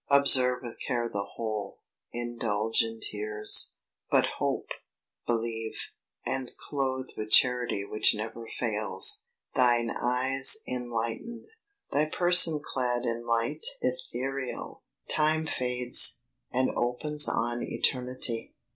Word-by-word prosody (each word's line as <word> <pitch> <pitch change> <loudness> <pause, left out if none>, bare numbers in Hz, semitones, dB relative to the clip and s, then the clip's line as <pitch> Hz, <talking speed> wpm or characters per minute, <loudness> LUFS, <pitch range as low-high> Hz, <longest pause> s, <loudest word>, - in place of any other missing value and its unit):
Observe 130 -3 +4
with 120 -2 -9
care 120 -1 -2
the 100 -3 -3
whole, 110 -3 -4 0.3
indulge 115 -2 -1
in 115 0 -4
tears, 105 0 0 0.3
But - - +4
hope, - - -2 0.6
believe, 115 -1 -2 0.5
and 130 -2 -3
clothed 130 -2 -3
with 110 0 -5
charity 125 -5 +3
Which 105 +1 +2
never 115 +2 -6
fails, 120 - +1 0.3
thine 120 -2 +2
eyes 130 - +4
enlightened, 125 - -4 0.5
Thy 150 +2 +2
person 175 -3 +5
clad 125 -3 -2
in 120 0 -2
light 115 - -1 0.2
ethereal. 135 - -4 0.3
Time 155 +1 +1
fades, 125 -4 +3 0.3
and 130 +1 +1
opens 150 +5 0
on 120 +1 -1
eternity. 125 -3 -1
125 Hz, 105 wpm, -28 LUFS, 115-135 Hz, 0.6 s, person